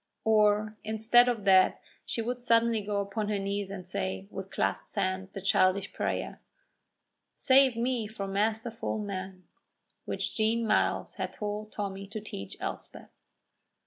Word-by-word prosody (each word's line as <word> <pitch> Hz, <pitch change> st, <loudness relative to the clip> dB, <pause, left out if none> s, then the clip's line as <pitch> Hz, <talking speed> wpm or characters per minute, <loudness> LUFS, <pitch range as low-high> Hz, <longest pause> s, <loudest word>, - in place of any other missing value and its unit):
Or 215 Hz, -1 st, +3 dB
instead 220 Hz, +3 st, +4 dB
of 230 Hz, -4 st, -2 dB
that 190 Hz, -1 st, +5 dB, 0.3 s
she 230 Hz, -, -2 dB
would 245 Hz, +2 st, -3 dB
suddenly 230 Hz, -2 st, +3 dB
go 200 Hz, 0 st, -1 dB
upon 205 Hz, +1 st, -3 dB
her 210 Hz, -, 0 dB
knees 200 Hz, 0 st, -2 dB
and 185 Hz, -2 st, -7 dB
say, 190 Hz, +1 st, -3 dB
with 195 Hz, 0 st, -6 dB
clasped -, -, -2 dB
hands, 190 Hz, -1 st, -1 dB
the 195 Hz, -, -6 dB
childish 195 Hz, 0 st, +2 dB
prayer, -, -, -3 dB, 0.9 s
"Save 265 Hz, -1 st, +5 dB
me 240 Hz, -2 st, 0 dB
from 200 Hz, -3 st, -5 dB
masterful 220 Hz, +3 st, -1 dB
men," 190 Hz, -3 st, -5 dB, 0.6 s
which -, -, -3 dB
Jean 225 Hz, +1 st, +1 dB
Myles -, -, +1 dB
had -, -, -3 dB
told 210 Hz, 0 st, -4 dB
Tommy 195 Hz, -1 st, -4 dB
to 215 Hz, +2 st, -5 dB
teach 100 Hz, -, -8 dB
Elspeth. -, -, -7 dB
210 Hz, 145 wpm, -29 LUFS, 195-225 Hz, 0.9 s, that